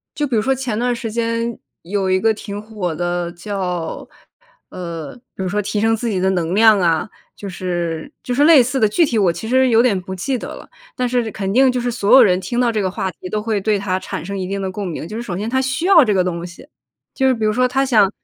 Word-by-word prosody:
就 295 Hz, -, 0 dB
比 255 Hz, -5 st, -2 dB
如 215 Hz, -, +3 dB
说 265 Hz, +4 st, +1 dB
前 250 Hz, -5 st, -3 dB
段 245 Hz, 0 st, 0 dB
时 230 Hz, -2 st, -5 dB
间 230 Hz, 0 st, -2 dB, 0.2 s
有 195 Hz, +1 st, -1 dB
一 185 Hz, 0 st, +3 dB
个 225 Hz, +2 st, +2 dB
挺 205 Hz, -1 st, -7 dB
火 205 Hz, -6 st, -4 dB
的 175 Hz, +1 st, -2 dB
叫， 180 Hz, -3 st, -4 dB, 0.6 s
呃， 170 Hz, -3 st, -7 dB, 0.2 s
比 190 Hz, -, -4 dB
如 -, -, -2 dB
说 210 Hz, +3 st, 0 dB
提 205 Hz, +1 st, -2 dB
升 225 Hz, +1 st, +2 dB
自 230 Hz, +1 st, -3 dB
己 200 Hz, -, -1 dB
的 190 Hz, +1 st, +2 dB
能 175 Hz, -1 st, -1 dB
量 220 Hz, -1 st, +6 dB
啊， 170 Hz, +2 st, +1 dB, 0.3 s
就 200 Hz, -, -7 dB
是 175 Hz, -2 st, -3 dB
就 250 Hz, -, -3 dB
是 285 Hz, +4 st, +3 dB
类 310 Hz, -5 st, +7 dB
似 260 Hz, +3 st, -2 dB
的， 215 Hz, -, +4 dB
具 215 Hz, +12 st, +2 dB
体 270 Hz, -7 st, 0 dB
我 185 Hz, -4 st, +3 dB
其 220 Hz, +6 st, -6 dB
实 260 Hz, +1 st, +4 dB
有 230 Hz, -1 st, +5 dB
点 225 Hz, -6 st, +2 dB
不 190 Hz, +1 st, -7 dB
记 255 Hz, +8 st, -2 dB
得 -, -, -7 dB
了， -, -, -13 dB, 0.3 s
但 250 Hz, -1 st, 0 dB
是 240 Hz, -2 st, 0 dB
肯 195 Hz, -1 st, -3 dB
定 260 Hz, +3 st, +5 dB
就 250 Hz, -1 st, -1 dB
是 245 Hz, 0 st, -1 dB
所 210 Hz, -4 st, +1 dB
有 265 Hz, -, +9 dB
人 185 Hz, -3 st, +3 dB
听 240 Hz, +5 st, -4 dB
到 245 Hz, -1 st, +2 dB
这 215 Hz, -2 st, -1 dB
个 190 Hz, -, 0 dB
话 190 Hz, 0 st, -3 dB
题 185 Hz, -, -10 dB
都 210 Hz, +3 st, -2 dB
会 215 Hz, -1 st, -1 dB
对 210 Hz, +1 st, +1 dB
它 190 Hz, -1 st, -2 dB
产 -, -, -6 dB
生 200 Hz, +1 st, -4 dB
一 185 Hz, -, -3 dB
定 195 Hz, +1 st, -3 dB
的 190 Hz, -, -3 dB
共 195 Hz, 0 st, -4 dB
鸣。 160 Hz, -2 st, -5 dB
就 215 Hz, +6 st, -6 dB
是 -, -, -3 dB
首 190 Hz, -7 st, -5 dB
先 215 Hz, +3 st, -3 dB
他 260 Hz, +1 st, +1 dB
需 265 Hz, +6 st, -2 dB
要 340 Hz, -8 st, +7 dB
这 210 Hz, -, +1 dB
个 185 Hz, -2 st, +2 dB
东 175 Hz, -1 st, -3 dB
西， 175 Hz, +7 st, -13 dB, 0.5 s
就 265 Hz, -, +1 dB
是 260 Hz, -, +4 dB
比 225 Hz, -3 st, -4 dB
如 215 Hz, -, +3 dB
说 250 Hz, +3 st, +2 dB
他 270 Hz, +2 st, +1 dB
想 215 Hz, -7 st, +4 dB
210 Hz, 295 characters per minute, -19 LUFS, 185-240 Hz, 0.6 s, 有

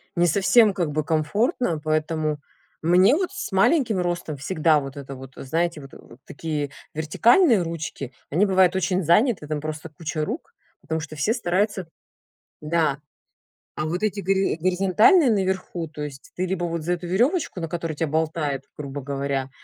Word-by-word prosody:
не 175 Hz, 0 st, +3 dB
совсем 200 Hz, +5 st, +4 dB
как 175 Hz, -6 st, -1 dB
бы 155 Hz, +1 st, -1 dB
комфортно, 165 Hz, -, 0 dB
поэтому 155 Hz, -1 st, -1 dB, 0.4 s
мне 185 Hz, -, +5 dB
вот 370 Hz, +2 st, -1 dB
с 395 Hz, 0 st, -6 dB
маленьким 220 Hz, -, +3 dB
ростом 175 Hz, -4 st, -2 dB
всегда 155 Hz, +1 st, +2 dB
вот 135 Hz, 0 st, -8 dB
это 140 Hz, -1 st, -7 dB
вот, 130 Hz, 0 st, -11 dB
знаете, 165 Hz, +3 st, -1 dB
вот, 135 Hz, -1 st, -13 dB
э, -, -, -12 dB, 0.3 s
такие 150 Hz, -2 st, -3 dB, 0.2 s
вертикальные 225 Hz, -, +4 dB
ручки, 155 Hz, -5 st, -5 dB, 0.2 s
они 175 Hz, +8 st, +3 dB
бывают 190 Hz, -2 st, +3 dB
очень 190 Hz, 0 st, 0 dB
заняты, 175 Hz, -, +3 dB
там 155 Hz, -1 st, -2 dB
просто 155 Hz, +1 st, -5 dB
куча 155 Hz, 0 st, -4 dB
рук, 310 Hz, -, -6 dB, 0.3 s
потому 160 Hz, 0 st, -3 dB
что 155 Hz, 0 st, -7 dB
все 155 Hz, +9 st, +1 dB
стараются 195 Hz, -4 st, -1 dB, 0.7 s
да. 155 Hz, -2 st, 0 dB, 0.8 s
А 155 Hz, -, -3 dB
вот 175 Hz, +4 st, -2 dB
эти 210 Hz, -1 st, 0 dB
гори 195 Hz, -2 st, +1 dB
горизонтальные 195 Hz, -, +4 dB
наверху, 190 Hz, -4 st, -1 dB
то 150 Hz, 0 st, -8 dB
есть 140 Hz, -2 st, -8 dB
ты 185 Hz, +1 st, -1 dB
либо 180 Hz, -1 st, -2 dB
вот 170 Hz, -1 st, -3 dB
за 175 Hz, +3 st, -1 dB
эту 175 Hz, 0 st, -7 dB
веревочку, 240 Hz, -, +1 dB
на 165 Hz, -, -3 dB
которой 165 Hz, 0 st, -3 dB
тебя 160 Hz, +2 st, -1 dB
болтает, 155 Hz, -2 st, -1 dB
грубо 140 Hz, -1 st, -6 dB
говоря, 140 Hz, -1 st, -2 dB
170 Hz, 165 wpm, -24 LUFS, 150-190 Hz, 0.8 s, мне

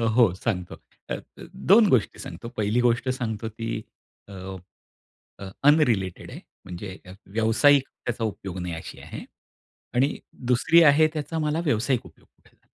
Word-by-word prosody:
हो, 115 Hz, -8 st, +5 dB
सांगतो. 95 Hz, -3 st, -3 dB, 0.3 s
अ, -, -, -1 dB
अ, -, -, -8 dB, 0.5 s
2 215 Hz, 0 st, +8 dB
गोष्टी 120 Hz, -, +2 dB
सांगतो, 115 Hz, -, -8 dB
1ली 105 Hz, +3 st, +1 dB
गोष्ट 120 Hz, +2 st, +2 dB
सांगतो 110 Hz, -4 st, -3 dB
ती, 115 Hz, +1 st, -6 dB, 0.6 s
अ, -, -, -10 dB, 1.1 s
अ, 100 Hz, -1 st, -7 dB, 0.2 s
अनरिलेटेड 115 Hz, -, +1 dB
आहे. -, -, -8 dB, 0.3 s
म्हणजे 95 Hz, +2 st, -7 dB
अ, 90 Hz, -, -11 dB, 0.2 s
व्यावसायिक 115 Hz, +7 st, +4 dB, 0.2 s
त्याचा 120 Hz, -1 st, -2 dB
उपयोग 95 Hz, -4 st, -4 dB
नाही 90 Hz, -1 st, -4 dB
अशी 80 Hz, -, -9 dB
आहे. -, -, -8 dB, 0.7 s
आणि 135 Hz, +4 st, +2 dB, 0.3 s
2री 165 Hz, +7 st, +5 dB
आहे, 155 Hz, +1 st, +6 dB
त्याचा 155 Hz, +1 st, -3 dB
मला 155 Hz, +1 st, 0 dB
व्यावसायिक 125 Hz, -1 st, +1 dB
उपयोग -, -, -18 dB
कुठे -, -, -29 dB
झाला. -, -, -43 dB
115 Hz, 150 wpm, -25 LUFS, 100-145 Hz, 1.1 s, 2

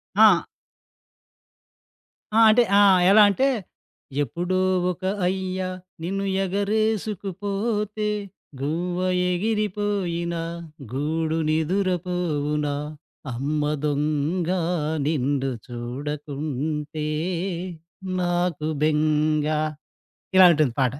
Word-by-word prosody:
ఆ! 205 Hz, -4 st, +6 dB, 1.9 s
ఆ! 225 Hz, -, +4 dB
అంటే, 240 Hz, +3 st, +6 dB, 0.2 s
ఆ! -, -, +7 dB, 0.3 s
ఎలా 210 Hz, +1 st, +8 dB
అంటే, 265 Hz, +7 st, +2 dB, 0.8 s
ఎప్పుడో 175 Hz, +8 st, -2 dB, 0.3 s
ఒక 180 Hz, +2 st, -10 dB, 0.2 s
అయ్య 185 Hz, 0 st, -2 dB, 0.4 s
నిన్ను 195 Hz, +3 st, -2 dB, 0.2 s
ఎగరేసుకుపోతే 210 Hz, +1 st, -1 dB, 0.5 s
గువ్వ 175 Hz, +5 st, -2 dB, 0.3 s
ఎగిరిపోయిన 200 Hz, -4 st, -1 dB, 0.6 s
గూడు 160 Hz, +4 st, -1 dB
నిదురపోవున 165 Hz, -3 st, 0 dB, 0.7 s
అమ్మ 145 Hz, +5 st, -1 dB, 0.2 s
దొంగా 155 Hz, +5 st, 0 dB, 0.5 s
నిన్ను 140 Hz, -2 st, 0 dB, 0.2 s
చూడకుంటే 150 Hz, +4 st, -4 dB, 1.1 s
నాకు 175 Hz, -3 st, 0 dB
బెంగ. 155 Hz, 0 st, +2 dB, 0.9 s
ఇలా 190 Hz, -, +9 dB
ఉంటుంది 150 Hz, -6 st, +2 dB
పాట. 130 Hz, -1 st, +2 dB
170 Hz, 70 wpm, -24 LUFS, 150-195 Hz, 1.9 s, ఇలా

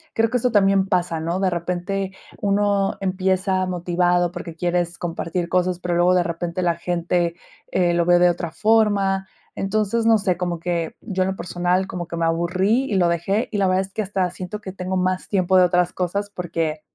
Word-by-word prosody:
creo 225 Hz, +1 st, +2 dB
que 250 Hz, -, +2 dB
esto 245 Hz, 0 st, 0 dB
también 195 Hz, -2 st, +3 dB
pasa, 175 Hz, -4 st, 0 dB
¿no?, 170 Hz, +3 st, -2 dB
de 190 Hz, -2 st, +1 dB
repente 180 Hz, +3 st, -2 dB, 0.3 s
uno 200 Hz, -1 st, +1 dB
empieza 185 Hz, 0 st, 0 dB
motivado 175 Hz, 0 st, +1 dB
porque 170 Hz, -2 st, -7 dB
quieres 175 Hz, 0 st, -1 dB
compartir 170 Hz, 0 st, -3 dB
cosas, 180 Hz, 0 st, 0 dB
pero 175 Hz, -1 st, -2 dB
luego 180 Hz, +1 st, +4 dB
de 180 Hz, -, +3 dB
repente 170 Hz, +1 st, -3 dB
la 170 Hz, -1 st, +2 dB
gente, 170 Hz, 0 st, -1 dB, 0.4 s
eh, 175 Hz, -2 st, +2 dB
lo 170 Hz, 0 st, +2 dB
ve 175 Hz, 0 st, +5 dB
de 175 Hz, 0 st, +5 dB
otra 170 Hz, -1 st, -5 dB
forma. 200 Hz, -2 st, +2 dB, 0.3 s
Entonces, 215 Hz, +3 st, 0 dB
no 225 Hz, -1 st, +6 dB
sé, 190 Hz, -4 st, 0 dB
como 175 Hz, -2 st, -2 dB
que 170 Hz, -1 st, -2 dB
yo 190 Hz, -4 st, -3 dB
en 190 Hz, -, -1 dB
lo -, -, -5 dB
personal 180 Hz, +1 st, 0 dB
como 175 Hz, -3 st, -6 dB
que 170 Hz, -, -6 dB
me 165 Hz, -, +1 dB
aburrí 185 Hz, +9 st, +1 dB
y 210 Hz, -, -2 dB
lo 175 Hz, -2 st, +3 dB
dejé, 195 Hz, +6 st, 0 dB
y 210 Hz, -, -2 dB
la 195 Hz, -, +3 dB
verdad 185 Hz, +1 st, +2 dB
es 195 Hz, -, -12 dB
que 220 Hz, -, -1 dB
hasta 190 Hz, -2 st, -1 dB
siento 185 Hz, +3 st, -6 dB
que 190 Hz, -3 st, -7 dB
tengo 185 Hz, 0 st, -3 dB
más 185 Hz, 0 st, -1 dB
tiempo 190 Hz, -2 st, +2 dB
de 180 Hz, -, +7 dB
otras 180 Hz, 0 st, +1 dB
cosas 200 Hz, +3 st, -2 dB
porque 165 Hz, -4 st, -3 dB
180 Hz, 205 wpm, -22 LUFS, 175-195 Hz, 0.4 s, de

